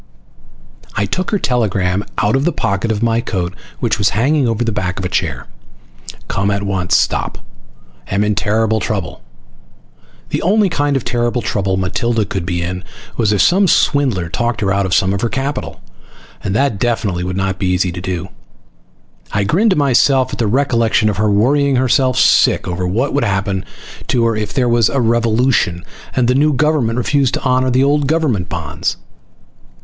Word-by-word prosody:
I 100 Hz, -, +1 dB
took 185 Hz, -, -2 dB
her 210 Hz, -, +1 dB
telegram 100 Hz, -, 0 dB
out 105 Hz, +3 st, +2 dB
of 135 Hz, -, +1 dB
the 175 Hz, -, +2 dB
pocket 110 Hz, -, -1 dB
of 110 Hz, +1 st, -1 dB
my 115 Hz, 0 st, +2 dB
coat 90 Hz, -6 st, -3 dB, 0.3 s
which -, -, 0 dB
was 100 Hz, -, +3 dB
hanging 135 Hz, +3 st, +2 dB
over 115 Hz, 0 st, 0 dB
the 115 Hz, -, -1 dB
back 95 Hz, -3 st, -3 dB
of 95 Hz, -, -3 dB
a -, -, -2 dB
chair. 80 Hz, -, -2 dB, 0.8 s
COME 100 Hz, +1 st, -1 dB
AT 100 Hz, 0 st, -1 dB
ONCE 95 Hz, -3 st, +1 dB
STOP -, -, -1 dB, 0.7 s
AM 100 Hz, +8 st, 0 dB
IN 105 Hz, 0 st, +1 dB
TERRIBLE 110 Hz, +2 st, +1 dB
TROUBLE... 95 Hz, -8 st, -4 dB, 1.1 s
The -, -, -2 dB
only 205 Hz, +2 st, +3 dB
kind 145 Hz, -4 st, 0 dB
of 130 Hz, -, -5 dB
terrible 120 Hz, 0 st, -1 dB
trouble 95 Hz, -2 st, -1 dB
Matilda 110 Hz, +4 st, 0 dB
could 95 Hz, -2 st, -4 dB
be 85 Hz, -2 st, -1 dB
in 90 Hz, +2 st, -4 dB, 0.3 s
was 110 Hz, -3 st, +1 dB
if 105 Hz, -3 st, +3 dB
some 190 Hz, +2 st, +4 dB
swindler 130 Hz, -, +2 dB
talked 120 Hz, +7 st, -2 dB
her 95 Hz, -1 st, +1 dB
out 100 Hz, -1 st, 0 dB
of 95 Hz, -, +1 dB
some 95 Hz, -1 st, +2 dB
of 100 Hz, -, -2 dB
her 120 Hz, -, 0 dB
capital! 135 Hz, +3 st, -4 dB, 0.6 s
And 95 Hz, -, -2 dB
that 125 Hz, -4 st, +1 dB
definitely 105 Hz, -7 st, -1 dB
would 90 Hz, +1 st, -3 dB
not 95 Hz, -1 st, -2 dB
be 95 Hz, -, -1 dB
easy 90 Hz, 0 st, +1 dB
to 90 Hz, +1 st, -7 dB
do. 90 Hz, 0 st, -4 dB, 1.0 s
I 100 Hz, -, +1 dB
grinned 190 Hz, -, +2 dB
to 190 Hz, -, +2 dB
myself 135 Hz, -1 st, +3 dB
at -, -, -5 dB
the 115 Hz, -, +1 dB
recollection 115 Hz, -3 st, +2 dB
of 105 Hz, -, -3 dB
her 105 Hz, 0 st, +1 dB
worrying 135 Hz, +7 st, +2 dB
herself 130 Hz, 0 st, +2 dB
sick -, -, +4 dB
once 90 Hz, -, -3 dB
over 90 Hz, +1 st, -2 dB
what 120 Hz, +10 st, -1 dB
would 145 Hz, -, +1 dB
happen 95 Hz, -1 st, -1 dB, 0.4 s
to 120 Hz, -3 st, +1 dB
her 115 Hz, -1 st, +1 dB
if 105 Hz, -1 st, -3 dB
there 125 Hz, -2 st, +1 dB
was 120 Hz, -2 st, +3 dB
a 140 Hz, -, -1 dB
revolution 115 Hz, -5 st, +1 dB, 0.3 s
and 125 Hz, -2 st, +2 dB
the 125 Hz, -, +3 dB
new 150 Hz, +3 st, +3 dB
government 140 Hz, -5 st, +1 dB
refused 135 Hz, +1 st, +1 dB
to -, -, -5 dB
honor 130 Hz, 0 st, +2 dB
the 130 Hz, +1 st, +2 dB
old 145 Hz, 0 st, +2 dB
government 135 Hz, -, 0 dB
bonds. 80 Hz, -4 st, -3 dB
110 Hz, 190 wpm, -16 LUFS, 95-130 Hz, 1.1 s, some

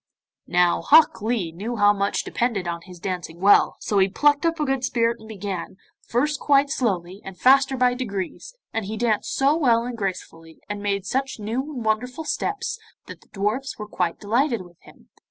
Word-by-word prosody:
Now, 175 Hz, 0 st, +2 dB
Hok 305 Hz, -5 st, +5 dB
Lee 215 Hz, -6 st, -1 dB
knew 210 Hz, +8 st, -5 dB
how 205 Hz, -1 st, +5 dB
much 200 Hz, 0 st, -1 dB
depended 225 Hz, -7 st, -1 dB
on 170 Hz, 0 st, -3 dB
his 180 Hz, +1 st, -13 dB
dancing 175 Hz, -2 st, -5 dB
well, 200 Hz, +2 st, +5 dB
so 205 Hz, -, +1 dB
he 190 Hz, 0 st, +4 dB
plucked 290 Hz, -, +3 dB
up 330 Hz, 0 st, -1 dB
a 300 Hz, -, +1 dB
good 270 Hz, -2 st, -1 dB
spirit 235 Hz, -2 st, +1 dB
and 220 Hz, 0 st, -13 dB
began, 195 Hz, -3 st, -5 dB, 0.3 s
first 290 Hz, +5 st, 0 dB
quite 280 Hz, -1 st, +3 dB
slowly, 195 Hz, -, -2 dB
and 195 Hz, -1 st, -9 dB
faster 270 Hz, +1 st, +4 dB
by 250 Hz, 0 st, +3 dB
degrees, 245 Hz, -, -5 dB, 0.2 s
and 225 Hz, -2 st, -2 dB
he 215 Hz, +3 st, -5 dB
danced 220 Hz, -2 st, 0 dB
so 275 Hz, +3 st, +3 dB
well 240 Hz, -7 st, +3 dB
and 245 Hz, 0 st, -5 dB
gracefully, 165 Hz, -5 st, -6 dB
and 205 Hz, 0 st, -5 dB
made 200 Hz, -1 st, -1 dB
such 265 Hz, +5 st, -2 dB
new 220 Hz, +5 st, -2 dB
and 240 Hz, -3 st, -5 dB
wonderful 250 Hz, +7 st, -1 dB
steps, 415 Hz, +8 st, -3 dB, 0.3 s
that -, -, -11 dB
the -, -, -23 dB
dwarfs 215 Hz, +7 st, -2 dB
were 210 Hz, -, -7 dB
quite 180 Hz, -4 st, -2 dB
delighted 235 Hz, +1 st, 0 dB
with 175 Hz, -2 st, -18 dB
him. -, -, -19 dB
220 Hz, 190 wpm, -23 LUFS, 195-260 Hz, 0.3 s, Hok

